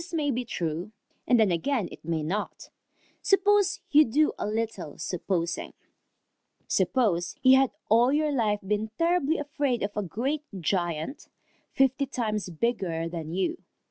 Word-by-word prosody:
This 340 Hz, 0 st, -7 dB
may 295 Hz, -3 st, +1 dB
be 250 Hz, 0 st, -2 dB
true, 175 Hz, 0 st, -3 dB, 0.3 s
and 245 Hz, -, +4 dB
then 215 Hz, -4 st, +4 dB
again 210 Hz, +4 st, 0 dB
it -, -, -12 dB
may 160 Hz, -1 st, -2 dB
not. 195 Hz, +7 st, -4 dB, 0.5 s
Suppose 405 Hz, 0 st, +3 dB
you 300 Hz, +1 st, +8 dB
do 300 Hz, +5 st, +2 dB
a -, -, -2 dB
little 215 Hz, -7 st, -3 dB
supposing. 175 Hz, -1 st, -2 dB, 0.9 s
Suppose 190 Hz, -, +1 dB
you 260 Hz, 0 st, +8 dB
had 270 Hz, -2 st, +3 dB, 0.2 s
all 235 Hz, +4 st, +4 dB
your 300 Hz, +1 st, +1 dB
life 215 Hz, -6 st, +1 dB
been 210 Hz, +2 st, -1 dB
terribly 335 Hz, -2 st, +2 dB
afraid 285 Hz, -5 st, -1 dB
of 200 Hz, 0 st, -3 dB
a 210 Hz, -, 0 dB
great 245 Hz, -, -2 dB, 0.2 s
giant 175 Hz, -, -2 dB, 0.5 s
fifty 270 Hz, +1 st, +2 dB
times 215 Hz, -6 st, -2 dB
bigger 170 Hz, -3 st, -1 dB
than 165 Hz, -2 st, -6 dB
you. 190 Hz, -, -1 dB
225 Hz, 145 wpm, -27 LUFS, 180-280 Hz, 0.9 s, you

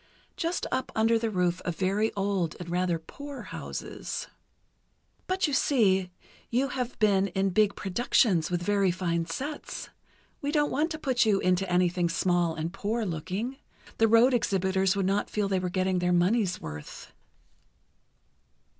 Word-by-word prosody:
Just 335 Hz, 0 st, -2 dB
up 260 Hz, 0 st, -1 dB
under 225 Hz, +1 st, +3 dB
the 225 Hz, 0 st, -1 dB
roof 180 Hz, -3 st, 0 dB
of 175 Hz, -, -2 dB
very 200 Hz, +5 st, +1 dB
old 195 Hz, -4 st, -1 dB
and 170 Hz, -1 st, -7 dB
rather 180 Hz, -1 st, +1 dB
poor 275 Hz, -, -9 dB
houses." -, -, -6 dB, 1.0 s
"But 370 Hz, 0 st, +1 dB
you 295 Hz, -, -1 dB
see, 195 Hz, -10 st, +3 dB, 0.4 s
you 260 Hz, +4 st, +1 dB
have 250 Hz, -1 st, -3 dB
been 200 Hz, -3 st, +3 dB
in 190 Hz, +1 st, 0 dB
big 205 Hz, +1 st, +3 dB
productions, 190 Hz, -, +2 dB
with 175 Hz, -1 st, -1 dB
very 200 Hz, -1 st, +2 dB
fine 170 Hz, -2 st, -1 dB
sets. 280 Hz, -, -5 dB, 0.5 s
We 285 Hz, -, -1 dB
don't 295 Hz, -1 st, +2 dB
want 305 Hz, +4 st, +1 dB
to 315 Hz, -, -4 dB
put 260 Hz, -5 st, +1 dB
you 210 Hz, -3 st, +3 dB
into 185 Hz, 0 st, +1 dB
anything 180 Hz, -1 st, +2 dB
small 175 Hz, -1 st, +1 dB
and 160 Hz, +3 st, -4 dB
poor 220 Hz, +3 st, -2 dB
looking. 185 Hz, -, -3 dB, 0.4 s
The 225 Hz, -, +5 dB
road 230 Hz, +4 st, +5 dB
exhibitors 190 Hz, -3 st, +1 dB
would 195 Hz, -2 st, 0 dB
not 200 Hz, +2 st, 0 dB
feel 210 Hz, -1 st, 0 dB
they 190 Hz, -1 st, +1 dB
were 180 Hz, 0 st, -2 dB
getting 185 Hz, 0 st, 0 dB
their 180 Hz, 0 st, +1 dB
money's 185 Hz, +2 st, +2 dB
worth." 75 Hz, -1 st, -9 dB
195 Hz, 155 wpm, -28 LUFS, 180-230 Hz, 1.0 s, The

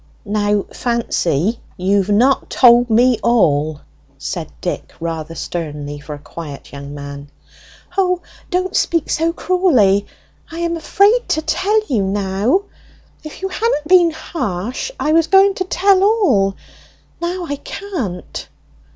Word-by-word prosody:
"Now, 205 Hz, -1 st, +1 dB
Fancy, 225 Hz, -, 0 dB, 0.2 s
you've 195 Hz, +1 st, +1 dB
not 245 Hz, +6 st, +3 dB
told 240 Hz, -1 st, +5 dB
me 240 Hz, +1 st, +4 dB
all!" 155 Hz, -10 st, +2 dB, 0.4 s
said -, -, -5 dB
Dick, -, -, -4 dB
rather 165 Hz, -1 st, -4 dB
sternly 145 Hz, -4 st, -5 dB
for 150 Hz, +1 st, -7 dB
a -, -, -10 dB
quiet 145 Hz, 0 st, -9 dB
young 140 Hz, 0 st, -8 dB
man. 140 Hz, 0 st, -8 dB, 0.7 s
"O, 365 Hz, -2 st, +2 dB, 0.3 s
don't 365 Hz, +1 st, -1 dB
speak 335 Hz, -3 st, +1 dB
so 330 Hz, +1 st, +1 dB
cruelly! 270 Hz, -, +2 dB, 0.4 s
I 330 Hz, -, -8 dB
am 340 Hz, 0 st, 0 dB
afraid 405 Hz, +8 st, +2 dB
to 315 Hz, -, 0 dB
tell 420 Hz, +6 st, +1 dB
now! 200 Hz, -, +1 dB, 0.6 s
If 310 Hz, +4 st, -10 dB
you 385 Hz, -, -1 dB
hadn't 375 Hz, -6 st, -1 dB
been 355 Hz, -1 st, +6 dB
harsh, 255 Hz, -, -4 dB
I 305 Hz, -, +1 dB
was 325 Hz, 0 st, +4 dB
going 390 Hz, +1 st, +6 dB
on -, -, -3 dB
to 370 Hz, -, -1 dB
tell 380 Hz, +1 st, +3 dB
all; 275 Hz, -, +3 dB, 0.7 s
now 350 Hz, +1 st, -2 dB
I 285 Hz, -3 st, -4 dB
can't!" 265 Hz, -, -6 dB
240 Hz, 135 wpm, -18 LUFS, -, 0.7 s, been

